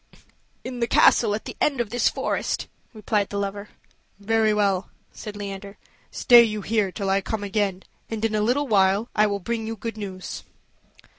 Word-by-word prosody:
"In 255 Hz, -1 st, -6 dB
the 235 Hz, -, 0 dB
castle 220 Hz, -2 st, +4 dB
at 215 Hz, -, -7 dB
the -, -, -7 dB
end 280 Hz, -4 st, +1 dB
of 230 Hz, -4 st, -2 dB
this 245 Hz, 0 st, +2 dB
forest," -, -, -2 dB, 0.2 s
replied 210 Hz, -2 st, -1 dB
the 200 Hz, -, -4 dB
lover. 200 Hz, +1 st, -4 dB, 0.5 s
"Very 220 Hz, +1 st, +2 dB
well," 200 Hz, -2 st, +1 dB, 0.2 s
said 210 Hz, -2 st, -8 dB
Leander; 200 Hz, 0 st, -7 dB, 0.3 s
"stay 240 Hz, -1 st, +6 dB
you 215 Hz, -3 st, -1 dB
here 210 Hz, -3 st, 0 dB
till 195 Hz, 0 st, -2 dB
I 195 Hz, 0 st, +2 dB
come 215 Hz, +1 st, -4 dB
again, 200 Hz, -2 st, -1 dB, 0.3 s
and 225 Hz, -1 st, -2 dB
in 220 Hz, -, -1 dB
a 215 Hz, -, +1 dB
little 255 Hz, +7 st, +1 dB
while 200 Hz, +1 st, +2 dB
I 215 Hz, 0 st, +3 dB
will 200 Hz, -1 st, -1 dB
bring 225 Hz, +3 st, -3 dB
you 225 Hz, -, -4 dB
good 225 Hz, +1 st, -6 dB
news." 190 Hz, -3 st, -7 dB
210 Hz, 180 wpm, -24 LUFS, 200-225 Hz, 0.5 s, stay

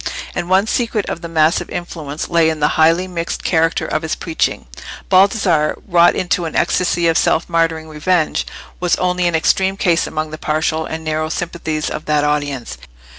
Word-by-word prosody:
And 175 Hz, -, -4 dB
one 190 Hz, +2 st, +4 dB
secret 225 Hz, -2 st, -1 dB
of 170 Hz, -, -4 dB
the 170 Hz, -, -6 dB
massive 165 Hz, +1 st, +1 dB
influence 160 Hz, -4 st, -5 dB
lay 165 Hz, -2 st, +3 dB
in 160 Hz, -1 st, -3 dB
the 150 Hz, 0 st, +2 dB
highly 165 Hz, +4 st, +3 dB
mixed 170 Hz, -2 st, -4 dB
character 165 Hz, -1 st, +1 dB
of -, -, -2 dB
his 160 Hz, -1 st, -2 dB
preaching. 165 Hz, -2 st, -2 dB, 0.5 s
Baldassarre, 185 Hz, -5 st, +3 dB
wrought 175 Hz, -2 st, +4 dB
into 180 Hz, -1 st, 0 dB
an 160 Hz, -, -5 dB
ecstasy 175 Hz, -1 st, +1 dB
of 165 Hz, -, +3 dB
self 165 Hz, -, +1 dB
martyring 165 Hz, -2 st, 0 dB
revenge, 155 Hz, +2 st, 0 dB, 0.3 s
was 180 Hz, -1 st, +2 dB
only 180 Hz, -1 st, 0 dB
an 170 Hz, -, 0 dB
extreme 190 Hz, +4 st, +1 dB
case 175 Hz, -4 st, +1 dB
among 155 Hz, 0 st, -4 dB
the 155 Hz, -, -7 dB
partial 155 Hz, +1 st, -1 dB
and 160 Hz, 0 st, -5 dB
narrow 155 Hz, 0 st, -2 dB
sympathies 160 Hz, -2 st, -3 dB
of -, -, -5 dB
that 150 Hz, -1 st, +1 dB
audience. 145 Hz, -4 st, -2 dB
165 Hz, 180 wpm, -18 LUFS, 155-180 Hz, 0.5 s, one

